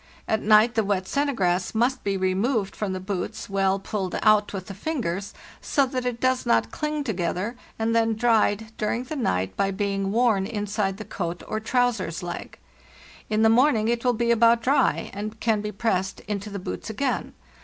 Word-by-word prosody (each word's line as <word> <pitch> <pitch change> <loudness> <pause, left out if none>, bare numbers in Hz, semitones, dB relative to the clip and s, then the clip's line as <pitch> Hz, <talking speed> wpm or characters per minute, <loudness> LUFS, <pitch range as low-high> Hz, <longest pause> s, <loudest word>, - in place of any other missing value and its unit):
At 220 - +1
night 215 +3 +5
the 225 -1 +2
wet 195 -2 0
"sennegraes"' 195 -9 0
must 250 +3 +1
be 200 -1 0
removed 195 +3 0
from 210 -3 -2
the 185 - -3
boots, 185 -1 -4
well 195 0 +2
pulled 195 -1 -3
out 215 -1 +4
with 190 -2 -5
the 195 - -7
fingers, 200 - -3 0.3
so 280 - +2
that 255 -1 -3
it 240 -1 -3
does 255 0 +1
not 115 0 +2
cling 300 -1 -2
together, 195 - -2 0.2
and 225 +1 0
then 225 -1 +2
dried 220 -1 +2
during 230 +3 -1
the 280 +5 -6
night 95 - -1
by 195 - +1
being 195 0 -1
worn 220 -4 +2
inside 205 -2 -2
the 215 - -7
coat 175 -2 -4
or 215 - -2
trousers 220 -8 0
leg. 175 - -6 0.7
In 215 0 +2
the 220 - +6
morn 255 +4 +5
ing 215 +1 0
it 235 0 0
will 250 -1 +3
be 235 0 +1
about 230 0 +4
dry, 275 +4 +2
and 215 +2 -5
can 220 -2 +1
be 210 0 -4
pressed 195 -3 -1
into 210 0 -4
the 200 - -5
boots 190 - -6
again. 255 +4 -2
215 Hz, 190 wpm, -25 LUFS, 195-235 Hz, 0.7 s, the